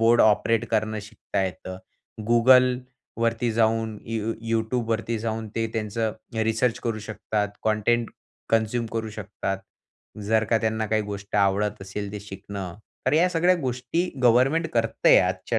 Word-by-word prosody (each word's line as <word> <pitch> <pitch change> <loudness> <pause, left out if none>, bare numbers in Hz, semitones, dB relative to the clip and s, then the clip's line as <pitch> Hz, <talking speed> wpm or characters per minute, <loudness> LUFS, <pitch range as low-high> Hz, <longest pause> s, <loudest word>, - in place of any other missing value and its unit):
Board 115 +1 +5
operate 110 +1 +3
करणं 110 -1 0
शिकता 105 -2 -4
येतं. 95 +1 -6 0.5
Googleवरती 125 -1 +3
जाऊन 110 -1 +1
यू 115 0 -2 0.2
YouTubeवरती 115 0 -1
जाऊन 110 0 -3
ते 115 0 +1
त्यांचं 110 0 -1 0.3
रिसर्च 115 +2 +1
करू 115 -2 -1
शकतात, 105 -1 -2 0.2
कंटेंट 110 +2 +1 0.4
कन्झ्युम 115 +1 +1
करू 110 -1 -2
शकतात, 100 -2 -4 0.7
जर 110 0 +3
का 115 - +5
त्यांना 110 -1 -1
काही 110 0 +1
गोष्ट 100 0 -5
आवडत 100 0 +1
असेल 100 +1 -5
ते 105 - -5
शिकणं, 95 -2 -7 0.3
तर - - +3
या 175 +3 +5
सगळ्या 175 +2 +3
गोष्टी 130 +4 -1 0.2
गव्हर्नमेंट 130 +8 +4
करत 115 -1 0
आहे - - +9
आजच्या - - 0
110 Hz, 140 wpm, -25 LUFS, 105-120 Hz, 0.7 s, आहे